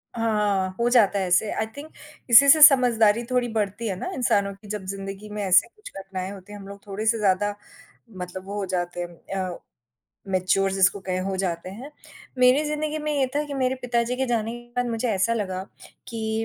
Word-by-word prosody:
हाँ, 210 -4 0
हो 235 +1 +2
जाता 215 -5 +4
है 190 - -1
ऐसे, 185 +4 +2
आई 220 - -1
थिंक 305 +2 -9 0.4
इसी 245 +4 +8
से 310 +2 +7
समझदारी 240 -6 +6
थोड़ी 250 -1 +1
बढ़ती 215 +1 -2
है 195 - -2
ना - - -4
इंसानों 200 -5 +1
की 205 +2 -17
जब 210 -2 -5
ज़िंदगी 195 +2 -7
में 210 0 -5
ऐसे 190 +2 +4
कुछ 425 - -14
घटनाएँ 190 -1 -6
होती 200 +1 -11
हैं, 205 - -9
हम 195 - -11
लोग 200 +1 -12
थोड़े-से 215 +3 0
ज़्यादा 205 0 +1 0.6
मतलब 180 +1 -7
वो 200 +1 -6
हो 200 - -2
जाते 175 -1 -3
हैं 175 -1 -7 0.4
अ, - - -11 0.7
मैच्योर 190 +1 +1
जिसको 195 +1 +2
कहें 185 -1 -3
हो 190 0 -3
जाते 180 -1 -3
हैं। 245 +9 -9 0.5
मेरी 255 +4 +5
ज़िंदगी 300 +1 -2
में 300 0 -2
ये 280 -2 +1
था 295 - +1
कि 285 - -6
मेरे 260 -1 0
पिताजी 240 0 0
के 265 +1 -1
जाने 230 -2 -1
के 240 0 -10
बाद 245 0 0
मुझे 230 +2 -2
ऐसा 200 +3 +1
लगा 190 -4 -3 0.5
कि 220 -1 -3
210 Hz, 205 wpm, -24 LUFS, 195-240 Hz, 0.7 s, इसी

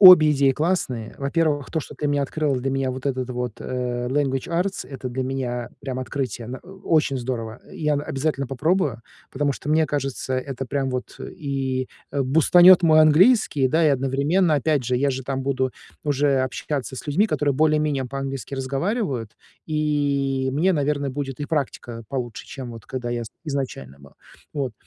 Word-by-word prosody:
Обе 180 -6 +10
идеи 140 -1 +4
классные. 130 -8 -1
Во-первых, 145 0 0
то, 160 - -1
что - - -10
ты 150 - -2
мне 145 0 +1
открыл 145 0 0
для 125 +2 -2
меня 135 -1 0
вот 130 +2 -5
этот 130 -2 -1
вот, 125 -1 -3
э, 125 -1 -2
Language 135 0 0
Arts,- 180 +3 -1
это 130 -2 -5
для 130 +1 -2
меня 125 -2 -3
прям 130 -2 -4
открытие. 130 -3 -4
На, 130 - -5
э, - - -24 0.2
очень 150 -4 +2
здорово. 120 -2 -4
Я, 150 -1 0
н 145 - -1
обязательно 140 0 -1
попробую, 140 -1 0 0.3
потому 145 +1 0
что 135 - -8
мне 155 +1 +3
кажется, 135 -2 -2
это 135 0 -3
прямо 135 +1 -1
вот, 125 0 -4
э, - - -6
и, 135 -3 -2 0.2
э, 140 -1 0
бустанёт 175 +6 +7
мой 155 -2 +6
английский, 155 - +5
да, 160 +4 +3
и, - - +6
одновременно, 140 +6 +2
опять 145 -1 +1
же, 125 +1 +1
я 140 +3 +2
же 130 0 -3
там 135 +1 -3
буду 130 -1 0 0.3
уже 145 -1 +2
общаться 130 +1 -3
с - - -8
людьми, 165 +9 +3
которые 145 -9 0
более-менее 150 -2 +2
по-английски 135 +1 -5
разговаривают, 135 - -2 0.3
и 140 -3 0
мне, 170 +7 +3
наверно, 145 -2 0
будет 135 0 -5
и 145 - -2
практика 125 -6 -3
получше, 125 -4 -4
чем 130 -4 -7
вот 115 -3 -10
когда 125 -2 -4
я 120 0 -1
из - - -7 0.2
изначально 130 - -4
был. 70 0 -16 0.4
Вот. 135 -5 -2
135 Hz, 180 wpm, -23 LUFS, 130-150 Hz, 0.4 s, Обе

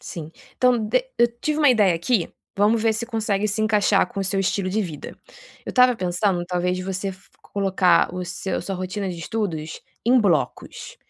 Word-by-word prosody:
Sim, 160 -2 -8 0.3
então 250 -1 +3
de 220 - 0
eu 240 - +6
tive 305 0 -1
uma 295 -2 +5
ideia 210 -7 +4
aqui, 170 +3 0 0.3
vamos 215 +3 +3
ver 225 -1 +3
se 215 +2 -2
consegue 215 -3 -1
se 210 +2 -1
encaixar 210 -2 +3
com 210 -5 -6
o - - -1
seu 195 +1 -1
estilo 195 0 0
de 215 +3 0
vida. 155 -6 -7 0.5
Eu - - -3
estava 250 -2 +4
pensando 180 0 0
talvez 180 0 -1
de 185 - -4
você 190 +1 -3
fo 185 +1 -19
colocar 190 -3 +2
o 180 0 -3
seu 190 - -3
sua 195 - -3
rotina 185 +2 -4
de 175 -2 -5
estudos 165 -5 -4 0.2
em 250 +1 +5
blocos. 170 -9 -1
195 Hz, 195 wpm, -23 LUFS, 180-220 Hz, 0.5 s, eu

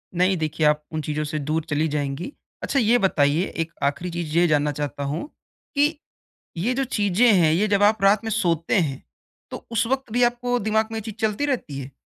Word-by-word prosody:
नहीं, 185 +1 +2
देखिये 155 0 0
आप 150 0 0
उन 155 -1 -3
चीज़ों 150 0 -2
से 155 +1 -3
दूर 155 +2 -2
चली 155 +2 +1
जाएँगी। 145 - -3 0.3
अच्छा 275 - +1
ये 235 +1 +4
बताइये, 165 -5 +2
एक 165 0 -4
आख़िरी 145 +6 -1
चीज़ 170 -1 -3
ये 175 - +5
जानना 150 -1 +2
चाहता 145 0 -4
हूँ 150 - -3 0.5
कि 295 +2 +2 0.6
ये 225 +10 0
जो 270 - 0
चीज़ें 220 -1 +2
हैं 170 -5 +4
ये 205 +6 +2
जब 200 0 +2
आप 210 0 +3
रात 200 +2 +4
में 225 - -3
सोते 170 -6 0
हैं 140 -5 -2 0.5
तो - - -4
उस 230 0 +1
वक़्त 265 -3 -2
भी 245 +1 +3
आपको 245 +1 +1
दिमाग़ 220 +1 +1
में 225 - -3
ये - - -7
चीज़ - - -14
चलती 220 +5 0
रहती 230 - -3
है? 135 +1 -8
175 Hz, 215 wpm, -23 LUFS, 150-220 Hz, 0.6 s, ये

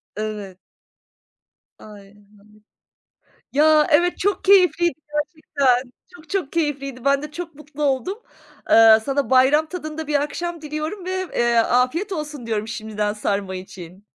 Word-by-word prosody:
Evet. 210 -3 -5 1.2
Ay, 205 -2 -13
anladım. 205 0 -23 1.2
Ya, 305 +1 +4
evet 350 +4 +3
çok 400 0 -1
keyifliydi 360 -4 +4
gerçekten! 280 -5 0 0.2
Çok, 335 -4 -17
çok 370 -8 -2
keyifliydi. 275 -6 -3
Ben 280 0 +2
de 300 - -7
çok 335 0 -7
mutlu 300 0 -9
oldum. 290 - 0 0.5
Iıı, 225 -1 +7
sana 275 +4 -2
bayram 265 +4 +4
tadında 315 -2 -6
bir 295 -1 +1
akşam 340 +3 -4
diliyorum 310 +6 -5
ve, 375 0 -3
eee, 235 0 +2
afiyet 255 - +1
olsun 300 -6 -5
diyorum 220 -1 -2
şimdiden 215 -2 -3
sarma 200 -2 -2
için. 185 +1 -11
285 Hz, 130 wpm, -21 LUFS, 225-320 Hz, 1.2 s, Iıı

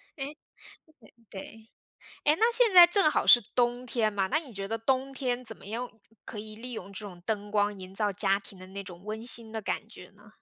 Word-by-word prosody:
诶， 290 +1 -6 0.9
对。 190 - -6 0.8
诶， 300 - +5
那 460 +2 +3
现 465 -3 +5
在 350 -1 +11
正 345 -3 +3
好 - - 0
是 240 - +9 0.2
冬 245 0 +1
天 230 -3 0
嘛， 195 -2 0
那 300 - +1
你 285 -7 -10
觉 195 0 -4
得 225 0 -2
冬 265 +3 0
天 255 -2 -2
怎 220 -1 0
么 - - -15
用 240 +4 -4 0.3
可 210 - -8
以 215 0 -7
利 245 +2 -6
用 200 -3 -7
这 205 +1 -7
种 180 -3 -11
灯 205 -2 -2
光 205 -1 +1
营 185 0 -10
造 205 -1 +1
家 195 0 +1
庭 200 -1 -11
的 185 - -10
那 200 +1 -6
种 180 0 -10
温 220 +2 -6
馨 230 -2 0
的 220 - -3
感 215 +1 -3
觉 180 -5 -13
呢？ 210 +1 -20
220 Hz, 240 characters per minute, -29 LUFS, 200-255 Hz, 0.9 s, 在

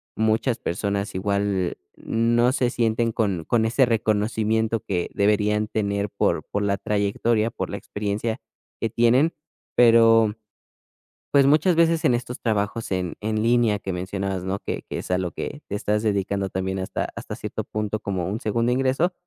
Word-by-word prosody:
muchas 110 +3 +1
personas, 100 +2 -2
igual, 100 -1 0 0.2
no 120 +2 +2
se 125 -3 +1
sienten 115 0 +1
con 100 -8 -1
con 115 -2 +2
ese 125 +4 +3
reconocimiento 110 0 +1
que 90 -3 -2
deberían 105 +1 +2
tener 100 -2 -1
por 100 - 0
por 105 - 0
la 100 -1 +1
trayectoria, 105 +3 0
por - - -4
la - - -4
experiencia 105 +3 -3 0.4
que 115 - 0
tienen, 125 +8 +3 0.4
pero, 115 -2 +6 1.0
pues, 140 -1 +5
muchas 155 +5 +4
veces, 165 -1 +3
en 125 - +4
estos 120 +1 -4
trabajos, 110 0 -1
en 90 -2 -2
en 110 0 -1
línea 115 -2 +3
que 95 -1 -5
mencionabas, 95 +1 -3
¿no?, 95 +1 -2
que - - -4
que - - -3
es - - -7
a 90 - +2
lo 90 -2 -2
que 145 +10 -6
te 100 - -4
estás 105 +1 0
dedicando 100 -2 0
también, 95 +1 -2
hasta 95 - -3
hasta - - -6
cierto - - -5
punto 105 0 -3
como 95 -4 -2
un 105 +4 -3
segundo 115 +2 0
ingreso 135 +8 +1
110 Hz, 165 wpm, -24 LUFS, 100-115 Hz, 1.0 s, pero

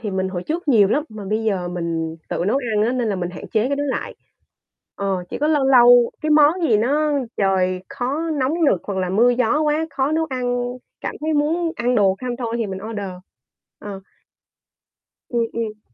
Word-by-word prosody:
thì 215 -4 -4
mình 190 0 -1
hồi 180 -2 -4
trước 320 - -4
nhiều 210 -7 +5
lắm, 290 +6 +1
mà 215 -2 -9
bây 215 +3 -1
giờ 190 -5 -1
mình 165 -2 -3
tự 175 - -2
nấu 225 - +2 0.2
ăn 210 - +3
á, 245 - 0
nên 245 -3 -1
là 200 - -1
mình 175 -1 -3
hạn - - -9
chế 220 +2 +1
cái 280 - 0
đó 290 - -1
lại. 270 - -3 0.8
Ờ, 190 -2 -2
chỉ - - -4
có 300 - +1
lâu 295 -3 +2
lâu 245 -2 +7
cái 310 - -1
món 305 +4 +5
gì 230 -9 +4
nó 295 +7 +1 0.2
trời 185 -2 +1
khó 290 +7 -2
nóng 280 -1 0
nực 195 - +3
hoặc 195 -2 -3
là 185 - -1
mưa 230 +6 +4
gió 250 +4 +1
quá, 305 +1 +1
khó 275 +3 -1
nấu 320 0 +1
ăn, 245 -1 -1 0.4
cảm - - -4
thấy 315 +1 -1
muốn 325 +3 +1
ăn 245 +1 0
đồ 195 -3 +3
không 250 -1 -3
thôi 230 -2 -3
thì 230 - -1
mình 190 -1 -5
order. 205 -4 -4 0.7
Ờ. 200 -2 -7 1.3
Ừm, 235 -2 0
ừm. 215 -2 -4
235 Hz, 210 wpm, -21 LUFS, 195-285 Hz, 1.3 s, lâu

